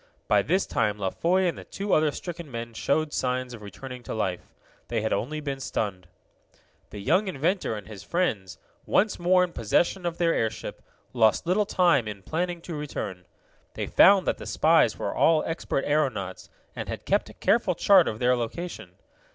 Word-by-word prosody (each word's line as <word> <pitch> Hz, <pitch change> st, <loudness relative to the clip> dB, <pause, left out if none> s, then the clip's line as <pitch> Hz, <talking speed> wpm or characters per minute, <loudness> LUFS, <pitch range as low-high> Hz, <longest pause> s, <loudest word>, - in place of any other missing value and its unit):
By -, -, +4 dB
this 190 Hz, +1 st, +1 dB
time 105 Hz, -2 st, 0 dB
La 95 Hz, -2 st, -2 dB
Foy 185 Hz, +3 st, +1 dB
and 170 Hz, -, -1 dB
the -, -, -9 dB
two 200 Hz, 0 st, -3 dB
other 155 Hz, 0 st, +4 dB
stricken 170 Hz, +1 st, -7 dB
men 115 Hz, -2 st, -6 dB
showed 150 Hz, +7 st, 0 dB
signs 125 Hz, -1 st, -1 dB
of 115 Hz, -, -10 dB
returning 125 Hz, +5 st, -9 dB
life. 95 Hz, -5 st, -3 dB, 0.4 s
They 115 Hz, -2 st, -1 dB
had 110 Hz, -, 0 dB
only 150 Hz, +9 st, -2 dB
been 140 Hz, -2 st, -4 dB
stunned. 100 Hz, -8 st, -3 dB, 0.8 s
The -, -, -9 dB
young 190 Hz, -, +2 dB
inventor 180 Hz, -, -1 dB
and 105 Hz, -3 st, -8 dB
his 105 Hz, -4 st, -9 dB
friends, 105 Hz, -, -2 dB, 0.3 s
once 210 Hz, +1 st, +2 dB
more 180 Hz, +1 st, +4 dB
in 175 Hz, -1 st, -3 dB
possession 175 Hz, -, +1 dB
of 170 Hz, 0 st, -4 dB
their 170 Hz, -1 st, +2 dB
airship, 110 Hz, -1 st, -3 dB, 0.3 s
lost 110 Hz, +1 st, +3 dB
little 195 Hz, +4 st, +2 dB
time 170 Hz, -11 st, +3 dB
in 100 Hz, -2 st, -7 dB
planning 175 Hz, -, -2 dB
to 170 Hz, -, -7 dB
return. 100 Hz, -, -5 dB, 0.5 s
They -, -, -2 dB
found 195 Hz, -1 st, +6 dB
that -, -, -1 dB
the -, -, -8 dB
spies 160 Hz, +1 st, +3 dB
were -, -, -3 dB
all 160 Hz, -1 st, +3 dB
expert 160 Hz, -4 st, -2 dB
aeronauts, 130 Hz, -11 st, -1 dB, 0.3 s
and -, -, -5 dB
had -, -, -6 dB
kept -, -, +1 dB
a -, -, -14 dB
careful 205 Hz, -5 st, +2 dB
chart 190 Hz, -2 st, +5 dB
of 105 Hz, -, -2 dB
their 125 Hz, +2 st, +3 dB
location. 145 Hz, +9 st, -5 dB
145 Hz, 185 wpm, -26 LUFS, 110-175 Hz, 0.8 s, found